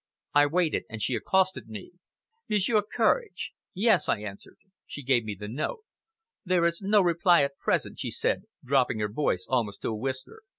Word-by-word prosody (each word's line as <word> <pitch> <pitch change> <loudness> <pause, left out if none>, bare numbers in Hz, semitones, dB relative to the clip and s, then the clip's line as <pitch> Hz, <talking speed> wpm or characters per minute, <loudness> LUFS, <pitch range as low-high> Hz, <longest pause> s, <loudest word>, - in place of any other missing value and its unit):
I 145 0 +6
waited, 165 +1 0
and 115 - -6
she 115 +5 0
accosted 190 +5 +1
me. 110 -3 -9 0.6
"Monsieur 210 +1 +3
Courage!" 440 - 0 0.2
"Yes!" 195 -4 +3
I 105 - +1
answered. 100 -1 -9 0.3
She 145 - -8
gave 125 -2 +2
me 105 -2 -5
the 105 - -6
note. 150 - -3 0.6
"There 180 -3 +2
is 170 +2 0
no 205 +1 +4
reply 175 -1 +4
at 140 0 -3
present," - - -1
she - - -3
said, - - -1 0.2
dropping 130 -3 +2
her 105 -1 -1
voice 105 -6 -1
almost 115 -6 -1
to - - -1
a 110 - -2
whisper. 130 - -5
145 Hz, 175 wpm, -27 LUFS, 115-185 Hz, 0.6 s, I